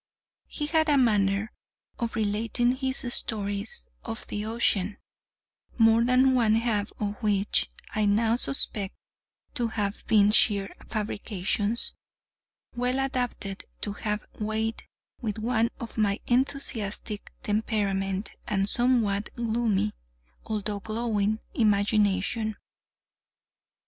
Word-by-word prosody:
He 295 - -3
had 315 +1 +2
a 290 - +5
manner 210 -3 +2 0.5
of 235 -2 -2
relating 225 +3 +1
his 265 0 0
stories 205 - 0 0.2
of 225 0 -5
the 210 - -3
ocean 215 -3 0 0.8
(more 225 0 +5
than 255 +2 +4
one 225 -4 +4
half 220 -3 0
of 210 +1 -3
which 205 -2 +2 0.2
I 215 -1 +1
now 220 +3 +3
suspect 215 -7 0 0.6
to 240 -2 +1
have 205 -2 -3
been 210 -2 +5
sheer 200 -3 +3
fabrications) 210 0 -1 0.8
well 250 +2 0
adapted 250 -7 -2 0.2
to 205 - 0
have 210 0 -3
weight 220 +1 -2 0.3
with 220 -3 -2
one 230 +1 +1
of 230 -3 -6
my 205 -1 +2
enthusiastic 240 -5 0
temperament 200 -2 -1 0.2
and 195 -1 +1
somewhat 220 -4 +3
gloomy 225 - 0 0.5
although 210 -1 -2
glowing 215 -1 -1 0.2
imagination. 210 0 +2
220 Hz, 105 wpm, -27 LUFS, 205-235 Hz, 0.8 s, a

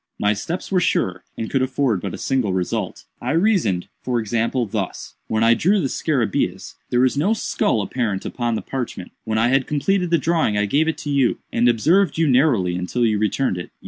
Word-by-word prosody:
My 105 0 +2
steps 170 - -5
were 185 - +3
sure, 95 - 0
and 110 - -3
could 135 - 0
afford 130 -6 0
but - - -4
a - - -8
single 130 -8 0
result. 90 -1 -3 0.2
I 125 +4 -1
reasoned, 165 - +1
for 125 -2 -1
example, 115 +3 0
thus: 100 - -4
When 110 0 0
I 115 +1 +6
drew 195 - +2
the 140 -7 -1
scarabæus, 130 -10 -1 0.2
there 125 - +2
was 130 +1 +3
no 195 +9 +2
skull 110 - 0
apparent 105 -2 -2
upon 120 -2 -2
the - - -4
parchment. 125 -8 -5
When 110 -1 -1
I 115 +2 +3
had 135 0 +2
completed 180 +5 0
the 170 - +4
drawing 160 -11 +1
I 105 - +2
gave 145 +10 +1
it 160 - -1
to 145 - -2
you, 135 -3 +2 0.2
and 120 +1 +3
observed 160 - +2
you 165 - +3
narrowly 125 - +3
until 90 +7 -1
you 110 -2 +1
returned 110 -2 0
it. 85 - -7
125 Hz, 210 wpm, -21 LUFS, 110-150 Hz, 0.2 s, I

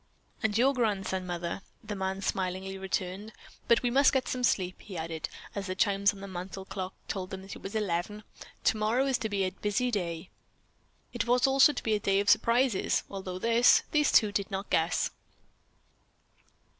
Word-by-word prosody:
"And 220 -2 +1
your 265 +4 +4
grandson, 195 -6 -1
mother?" 175 +1 -3 0.2
the 210 - -5
man 190 0 -3
smilingly 190 +1 -2
returned. 190 +2 -4 0.3
"But 235 0 +4
we 245 - +1
must 275 +2 +5
get 265 -1 0
some 250 -1 -3
sleep," 185 -6 +1
he 195 -4 -8
added, 160 0 -4 0.2
as 200 -1 -4
the 185 - -3
chimes 200 0 +3
on 195 - -12
the 200 - -7
mantle 190 +1 -7
clock 190 -1 -5
told 185 -2 -4
them 190 0 -7
that 195 - -8
it - - -12
was 195 - -7
eleven. 210 +1 -2 0.4
"Tomorrow 220 +5 +2
is 265 -2 +1
to 220 -3 -2
be 200 -1 0
a 185 - 0
busy 210 +6 -1
day." 170 -6 -3 0.8
It - - -2
was 245 +2 +4
also 270 +2 +6
to 280 - -6
be 220 - +1
a 210 - +2
day 195 -1 +2
of 200 - +4
surprises, 235 -2 +2
although 190 -2 -5
this, 230 +4 +5
these 300 -1 +3
two 210 -2 +5
did 200 -1 -2
not 195 0 -5
guess. 165 +1 +1
200 Hz, 185 wpm, -29 LUFS, 190-230 Hz, 0.8 s, also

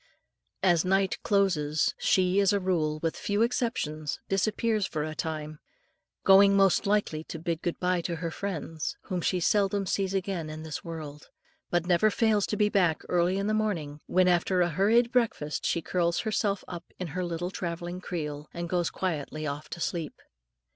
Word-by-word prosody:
As 175 -4 +4
night 190 0 +1
closes, 165 -7 +1
she, 185 +1 +3
as 200 -1 +4
a 200 - +2
rule, 165 -5 0
with 165 - 0
few 205 +2 0
exceptions, 155 - -1
disappears 215 +1 +1
for 150 -2 -3
a 155 0 -4
time, 155 -1 -4 0.6
going 195 +1 +7
most 195 0 +4
likely 200 -7 +1
to - - -6
bid 165 0 -3
good 175 - -3
bye 180 -1 +1
to 170 0 -3
her 165 0 -4
friends, 165 -5 -4
whom 185 -3 -3
she 180 +2 +1
seldom 200 +2 +2
sees 195 +1 -1
again 185 -4 -2
in 155 0 -7
this 160 -1 -6
world, 155 -3 -8 0.4
but 175 -1 +1
never 180 +4 +4
fails 215 -1 +2
to 210 - -2
be 210 - +4
back 180 -6 +2
early 180 +1 +2
in 195 - -1
the 215 - +1
morning, 165 -9 -2
when, 185 0 +3
after 180 +1 +2
a 175 - +3
hurried 220 +8 +3
breakfast, 230 - 0
she 170 - 0
curls 170 -1 0
herself 210 -2 0
up 175 -1 -7
in 180 -2 -4
her 180 +5 -3
little 175 +1 -3
travelling 175 0 -4
"creel," 150 -5 -5
and 170 0 -4
goes 175 -1 +1
quietly 155 -4 -3
off 145 +1 -5
to - - -6
sleep. 165 -2 -3
180 Hz, 180 wpm, -28 LUFS, 160-195 Hz, 0.6 s, going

